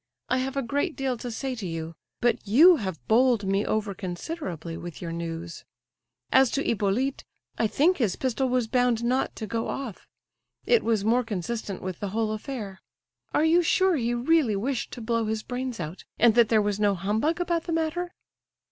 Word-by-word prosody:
I 255 - +2
have 265 +1 -3
a 275 - +1
great 285 +7 -1
deal 265 -2 -1
to 245 - -5
say 260 +3 -3
to 225 -6 -5
you. 165 -1 -5 0.3
But 240 -1 +2
you 320 - +7
have 190 - -5
bowled 240 -1 +4
me 195 +1 +1
over 215 -2 -1
considerably 175 - -5
with 170 0 -8
your 170 -2 -5
news. 165 0 -5 0.7
As 265 -1 +6
to 280 - +1
Hippolyte, 230 +6 0 0.4
I 225 - +3
think 330 - +3
his 215 -8 +1
pistol 260 0 -1
was 250 -1 +1
bound 245 0 +1
not 255 +2 0
to 220 - -5
go 225 +2 -2
off; 260 -8 -6 0.6
it 470 - +4
was 220 -3 +1
more 240 +3 +3
consistent 210 -1 -4
with 185 -2 -5
the 205 - -3
whole 215 +2 -1
affair. 215 -3 -6 0.5
Are 310 - +4
you 335 +2 +5
sure 375 +2 +3
he 240 -3 0
really 255 -2 +2
wished 245 +5 -2
to 245 - -7
blow 230 0 0
his 220 0 -2
brains 250 -2 -4
out, 165 +2 -6
and 235 -1 +5
that 235 -1 +5
there 220 -2 +4
was 205 0 -1
no 205 -1 +3
humbug 220 - 0
about 340 -2 0
the 340 - -3
matter?" 330 +2 -2
230 Hz, 190 wpm, -26 LUFS, 200-270 Hz, 0.7 s, you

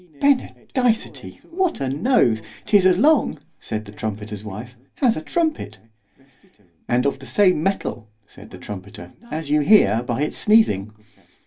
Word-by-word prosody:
Benedicity!——What 275 +6 -1
a 135 - -2
nose! 135 - +2 0.2
'tis 200 -3 +4
as 180 -1 +3
long, 290 - +3 0.2
said 110 0 -5
the 105 - -11
trumpeter's 105 -1 -6
wife, 110 +4 -8 0.2
as 245 -5 +3
a - - -4
trumpet. 315 - -2 1.1
And 125 +2 +1
of 140 -1 0
the 135 - -11
same 185 - +3
metal 160 - -2 0.2
said - - -15
the - - -11
trumpeter, 95 -3 -9 0.2
as 155 -5 -5
you 150 0 +3
hear 140 - +4
by 125 +3 -2
its 150 - -3
sneezing. 160 - +3
140 Hz, 140 wpm, -21 LUFS, -, 1.1 s, tis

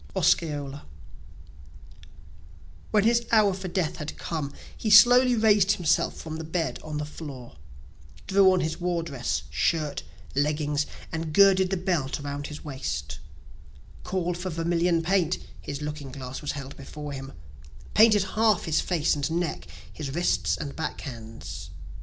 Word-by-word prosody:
Osceola 145 - 0 2.0
When 210 -2 +3
his 235 +1 +2
hour 215 -3 +5
for 190 0 -5
death 175 -2 -1
had 150 -2 -6
come, 155 -4 -3 0.2
He 220 - -3
slowly 245 +4 +8
rais'd 210 -3 +4
himself 175 -3 +1
from 160 -1 -6
the 160 - -5
bed 160 +1 -2
on 155 -1 -5
the 150 - -2
floor, 140 - -9 0.7
Drew 195 -1 +5
on 185 -1 +2
his 160 +1 -3
war 175 -1 0
dress, 130 - -2
shirt, 150 - 0 0.3
leggings, 150 +1 0 0.2
and 160 -1 -4
girdled 190 -2 +6
the 190 - 0
belt 175 -7 -1
around 145 0 -5
his 150 0 -9
waist, 75 - -4 0.8
Call'd 180 -2 -2
for 185 +1 -3
vermilion 170 0 +1
paint 180 -1 +2 0.2
(his 140 +1 -5
looking 150 -2 -5
glass 130 -1 -7
was 145 - -3
held 140 -1 -7
before 145 +2 -7
him,) 135 0 -7 0.6
Painted 215 -2 +6
half 215 -4 +3
his 160 -2 +1
face 170 -3 +1
and 145 +1 -1
neck, 170 0 -2 0.3
his 140 -2 -5
wrists, 100 - +1
and 140 +4 -6
back 160 - -4
hands. 115 -5 -8
160 Hz, 145 wpm, -26 LUFS, 145-185 Hz, 2.0 s, slowly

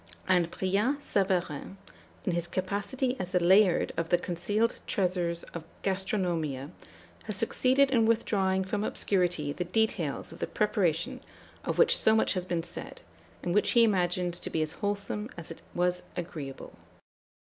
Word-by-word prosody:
And 175 -2 +3
Brillat 210 +12 0
Savarin, 185 -3 -1 0.5
in 185 - +1
his 170 0 -1
capacity 200 +8 -1
as 185 0 -4
the 180 - +4
Layard 185 +1 +5
of 165 0 -2
the 175 - +5
concealed 190 +7 -1
treasures 180 -3 0
of 170 - -5 0.2
Gastronomia, 175 -8 -1 0.5
has 215 -2 -4
succeeded 260 +5 +3
in 230 -4 +4
withdrawing 195 -4 +2
from 205 +2 -2
obscurity 175 -9 0
the 180 - -2
details 180 -6 -1
of - - -11
the - - -2
preparation 210 +3 0 0.4
of - - -2
which 480 - +6
so 220 - +4
much 220 - +3
had 185 -2 -3
been 170 -2 -1
said, 170 - -8 0.4
and 175 - -1
which 210 - +3
he 235 - +6
imagines 180 -4 +1
to - - -5
be 160 - 0
as 155 - -3
wholesome 205 +2 -3
as 170 -1 -7
it 165 - -9
was 180 0 +1 0.2
agreeable. 155 -6 -6
185 Hz, 155 wpm, -29 LUFS, 170-210 Hz, 0.5 s, which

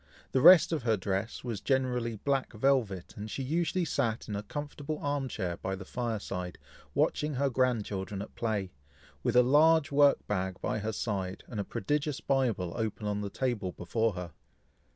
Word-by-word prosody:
The 130 - +2
rest 175 +3 +9
of 160 -4 0
her 115 -2 +2
dress 100 +3 -3
was 115 -5 -4
generally 125 -4 0
black 135 +4 -1
velvet, 110 -6 +1
and 105 +1 -6
she 135 - -3
usually 170 +5 0
sat 115 -7 -1
in 105 - -3
a 100 - -2
comfortable 145 +4 -5
arm 145 -2 -1
chair 90 -8 -3
by 95 +1 -3
the 95 0 -9
fire 120 -1 -2
side, 90 -3 -5 0.4
watching 150 -1 +1
her 140 +1 +1
grandchildren 105 -6 0
at - - -12
play, 105 -5 -2 0.5
with - - 0
a 125 - +8
large 155 +3 +5
work 145 0 +4
bag 95 -2 -2
by - - -1
her 110 +1 -2
side, 95 -4 -3
and 110 - -5
a - - 0
prodigious 145 +8 -1
Bible 120 -10 0
open 110 -1 -3
on 105 0 -1
the 100 - -3
table 110 -7 -2
before 110 +5 0
her. 90 -2 -6
115 Hz, 180 wpm, -30 LUFS, 100-140 Hz, 0.5 s, rest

